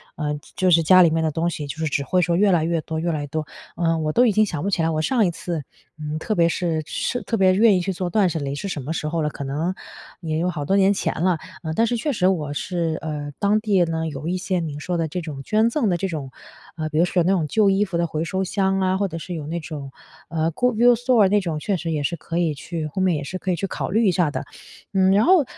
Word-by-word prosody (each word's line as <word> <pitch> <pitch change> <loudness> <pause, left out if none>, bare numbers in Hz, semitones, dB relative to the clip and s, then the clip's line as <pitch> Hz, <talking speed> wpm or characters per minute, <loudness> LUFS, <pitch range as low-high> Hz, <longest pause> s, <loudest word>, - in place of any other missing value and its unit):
呃， 150 -2 -3 0.2
就 185 - +2
是 165 -1 +6
家 185 +3 +7
里 170 - +5
面 160 0 +1
的 160 - +2
东 165 +3 -1
西， 150 - -5
就 140 - -6
是 160 - -2
只 140 -1 0
会 180 +5 +1
说 170 -1 +1
越 200 +2 +4
来 170 -3 +3
越 165 0 0
多 160 0 -4
越 170 +1 -1
来 155 - -2
越 145 - -5
多。 155 +2 -3 0.3
呃， 165 -1 +1
我 155 -1 -1
都 245 +7 +4
已 220 - +4
经 215 +2 +3
想 165 -7 -4
不 200 - 0
起 175 - +1
来， 165 - +2
我 155 -1 0
上 230 +6 +2
一 180 - +2
次， 165 -2 -4 0.4
嗯， 150 0 -4
特 215 - -2
别 170 -1 +4
是 165 -3 -1
是 245 - -2
特 230 - -2
别 185 -1 +4
愿 215 0 +5
意 180 - 0
去 195 - -2
做 180 0 -3
断 210 -3 +3
舍 165 - -3
离 140 -1 -3
是 200 - -5
什 155 -6 -4
么 155 +5 -3
时 155 - -3
候 165 +1 -1
了， 150 - 0
可 140 - -7
能 155 +7 -2 0.5
也 160 -2 -2
有 175 +2 0
好 150 -4 -4
多 190 - +2
年 195 +1 +4
前 - - -1
了。 180 -3 +2 0.2
呃， 160 -1 -3
但 225 +6 +2
是 240 - 0
确 290 +5 -1
实 185 -5 +2
我 155 -6 0
是， 165 0 -2
呃， 150 -2 -4
当 205 +1 +3
地 205 -4 +2
呢， 160 0 -2
有 150 0 -6
一 180 +2 0
些 185 -1 -1
您 150 -3 -4
说 180 +3 -3
的 165 -1 0
这 180 +4 -4
种 150 -4 -7
捐 220 +6 +2
赠 235 -5 +1
的 175 - +1
这 195 - -2
种， 150 -7 -5 0.5
呃， 155 -1 -3
比 155 0 -1
如 175 - +5
说 180 0 +1
有 - - +2
那 185 - +3
种 165 -5 0
旧 210 +5 +3
衣 195 +1 +2
服 185 -4 -3
的 170 - +1
回 160 0 -3
收 190 +3 -2
箱 195 0 0
啊， 185 0 +1
或 200 0 0
者 165 -2 -6
是 180 +2 -6
有 155 -3 -5
那 170 +2 -3
种， 145 -4 -7 0.4
呃， 165 0 0
good 250 +8 0
use 245 0 +6
store 245 -5 +5
那 205 0 +3
种， 165 -4 -3
确 200 +6 -1
实 170 -1 -4
也 150 -2 -1
是 170 - -1
可 170 0 -5
以 170 -3 +1
去 160 +2 -5
后 190 +6 -4
面 180 -4 +2
也 145 - -4
是 185 +6 -5
可 185 - -2
以 175 - +1
去 195 - -3
考 - - -4
虑 220 +4 +2
一 185 - +5
下 175 -3 +2
的。 - - -4 0.5
嗯， 190 0 +4
然 205 +3 +4
后， 360 -5 +6
170 Hz, 345 characters per minute, -22 LUFS, 155-190 Hz, 0.5 s, 家